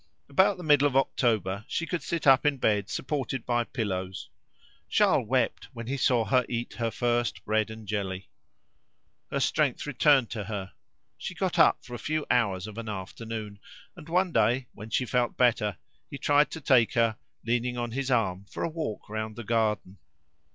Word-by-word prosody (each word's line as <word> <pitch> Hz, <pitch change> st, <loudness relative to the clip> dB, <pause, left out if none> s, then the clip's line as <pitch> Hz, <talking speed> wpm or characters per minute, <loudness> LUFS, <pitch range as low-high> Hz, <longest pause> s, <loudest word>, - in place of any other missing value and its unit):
About 190 Hz, +7 st, +4 dB
the 180 Hz, -, -8 dB
middle 145 Hz, -2 st, +5 dB
of 135 Hz, -, -4 dB
October 110 Hz, -7 st, +1 dB
she 170 Hz, -, -2 dB
could 175 Hz, -1 st, -3 dB
sit 170 Hz, -2 st, -3 dB
up 135 Hz, -2 st, +6 dB
in 145 Hz, -2 st, +2 dB
bed 105 Hz, -4 st, +1 dB
supported 135 Hz, -3 st, -3 dB
by 120 Hz, -1 st, +1 dB
pillows. 95 Hz, -6 st, -4 dB, 0.6 s
Charles -, -, +3 dB
wept -, -, 0 dB
when 115 Hz, 0 st, -7 dB
he 130 Hz, +4 st, -2 dB
saw 125 Hz, -4 st, +2 dB
her 125 Hz, +5 st, +3 dB
eat 120 Hz, 0 st, -3 dB
her 115 Hz, -1 st, +1 dB
first 120 Hz, -1 st, -1 dB
bread 110 Hz, +1 st, +1 dB
and 110 Hz, -1 st, -9 dB
jelly. 95 Hz, -3 st, -3 dB, 1.0 s
Her -, -, -1 dB
strength -, -, +1 dB
returned 140 Hz, -3 st, +3 dB
to 105 Hz, -3 st, -4 dB
her; 100 Hz, -2 st, -5 dB, 0.5 s
she -, -, -5 dB
got -, -, -1 dB
up -, -, +5 dB
for 120 Hz, -, -10 dB
a 120 Hz, -, -5 dB
few 155 Hz, 0 st, -2 dB
hours 100 Hz, -6 st, +1 dB
of 110 Hz, +1 st, -7 dB
an 115 Hz, -1 st, -5 dB
afternoon, 105 Hz, +1 st, -6 dB, 0.4 s
and 165 Hz, -2 st, -12 dB
one 180 Hz, +1 st, +2 dB
day, 125 Hz, -1 st, +2 dB
when 105 Hz, +2 st, -10 dB
she 125 Hz, +3 st, 0 dB
felt 125 Hz, 0 st, 0 dB
better, 110 Hz, -6 st, +2 dB, 0.3 s
he 140 Hz, -, -6 dB
tried 145 Hz, +2 st, +3 dB
to 160 Hz, -, -7 dB
take 125 Hz, -5 st, +4 dB
her, 115 Hz, -2 st, +2 dB, 0.3 s
leaning 120 Hz, +1 st, 0 dB
on 120 Hz, -1 st, -3 dB
his 135 Hz, +2 st, -2 dB
arm, 100 Hz, -6 st, +1 dB
for -, -, -5 dB
a -, -, 0 dB
walk 155 Hz, -9 st, -5 dB
round 110 Hz, 0 st, -4 dB
the 120 Hz, -, -7 dB
garden. 105 Hz, -4 st, -1 dB
120 Hz, 185 wpm, -28 LUFS, 105-135 Hz, 1.0 s, up